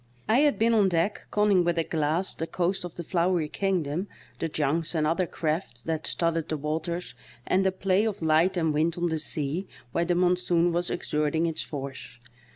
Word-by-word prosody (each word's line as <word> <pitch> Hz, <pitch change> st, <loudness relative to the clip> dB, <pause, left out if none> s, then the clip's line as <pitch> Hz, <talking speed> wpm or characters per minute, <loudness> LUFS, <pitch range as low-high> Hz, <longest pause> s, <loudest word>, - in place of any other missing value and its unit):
I 220 Hz, +4 st, +4 dB
had 295 Hz, -1 st, +3 dB
been 230 Hz, +1 st, +3 dB
on 205 Hz, -4 st, +4 dB
deck 175 Hz, +4 st, -1 dB
conning 205 Hz, -3 st, +3 dB
with 175 Hz, 0 st, 0 dB
a 165 Hz, -, +2 dB
glass 160 Hz, +4 st, 0 dB
the 165 Hz, -, -4 dB
coast 180 Hz, +2 st, -1 dB
of 175 Hz, -2 st, -7 dB
the 170 Hz, -, -5 dB
FloweryKingdom, 175 Hz, 0 st, 0 dB, 0.3 s
the 165 Hz, -, -1 dB
junks 155 Hz, +3 st, 0 dB
and 155 Hz, -1 st, +2 dB
other 170 Hz, +3 st, +1 dB
ciaft 155 Hz, -8 st, -3 dB
that 160 Hz, -1 st, -2 dB
studded 165 Hz, -1 st, 0 dB
the 155 Hz, -, -1 dB
waters, 160 Hz, 0 st, -3 dB, 0.3 s
and 190 Hz, +1 st, +2 dB
the 190 Hz, -, +2 dB
play 190 Hz, +2 st, +1 dB
of 210 Hz, -3 st, -2 dB
light 160 Hz, +4 st, +3 dB
and 160 Hz, -3 st, +1 dB
wind 160 Hz, +3 st, +1 dB
on 175 Hz, 0 st, 0 dB
the 160 Hz, -1 st, -1 dB
sea 155 Hz, +4 st, -2 dB, 0.2 s
where 170 Hz, -, +1 dB
the 175 Hz, +1 st, +1 dB
monsoon 175 Hz, -1 st, +2 dB
was 175 Hz, +1 st, 0 dB
exerting 150 Hz, +2 st, 0 dB
its 165 Hz, -1 st, -2 dB
force. 135 Hz, -4 st, -7 dB
170 Hz, 190 wpm, -27 LUFS, 155-185 Hz, 0.3 s, I